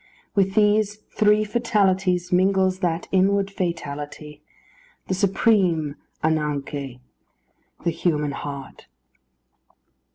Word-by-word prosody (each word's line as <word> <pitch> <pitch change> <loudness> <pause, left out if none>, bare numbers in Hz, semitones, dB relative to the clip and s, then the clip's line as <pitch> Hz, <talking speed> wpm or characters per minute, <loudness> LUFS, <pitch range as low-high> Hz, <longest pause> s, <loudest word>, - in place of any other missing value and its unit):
With 195 -2 +1
these 210 -1 +3
three 210 0 +2
fatalities 195 -5 +1
mingles 185 0 +2
that 170 -2 -1
inward 195 +1 +2
fatality 150 -4 -5 0.6
the - - -2
supreme 185 -6 +2 0.3
[Greek: 160 0 +3
anagkê], 140 -4 -3 0.8
the 170 - +1
human 155 -3 0
heart. 140 -1 -7
185 Hz, 90 wpm, -23 LUFS, 150-200 Hz, 0.8 s, these